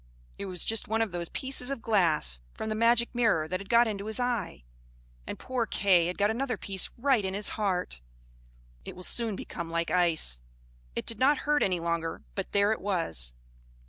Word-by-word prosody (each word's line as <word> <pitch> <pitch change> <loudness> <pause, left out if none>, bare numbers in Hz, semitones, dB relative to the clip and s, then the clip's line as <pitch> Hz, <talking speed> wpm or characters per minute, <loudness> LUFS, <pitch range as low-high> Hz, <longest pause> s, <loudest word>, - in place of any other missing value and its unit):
It 200 - -4
was 180 -2 0
just 225 -1 +1
one 225 +1 +1
of 220 - -4
those 170 -1 -4
pieces 260 -1 +1
of 275 -5 -4
glass 165 - +2 0.2
from 220 - -4
the - - 0
magic 235 +2 +3
mirror 225 -10 +2
that 185 +2 -2
had 195 0 -10
got 235 0 +5
into 205 -1 -4
his 220 +3 -2
eye; 235 - -2 0.6
and - - -5
poor 250 -3 -2
Kay 180 -4 +3
had 180 - -4
got 205 +1 +2
another 245 0 -2
piece 195 -1 -2
right 255 -3 +2
in 190 0 -2
his 205 +1 +2
heart. 180 - -2 0.8
It - - -8
will 185 - -8
soon 225 +1 +1
become 170 -2 -6
like 170 0 -1
ice. 160 - +1 0.5
It - - -3
did 230 -2 -2
not 280 +3 +3
hurt 295 0 +2
any 180 -2 +1
longer, 170 -1 -2
but - - -4
there 200 +1 +3
it 220 - -2
was. 80 - 0
200 Hz, 200 wpm, -29 LUFS, 170-230 Hz, 0.8 s, got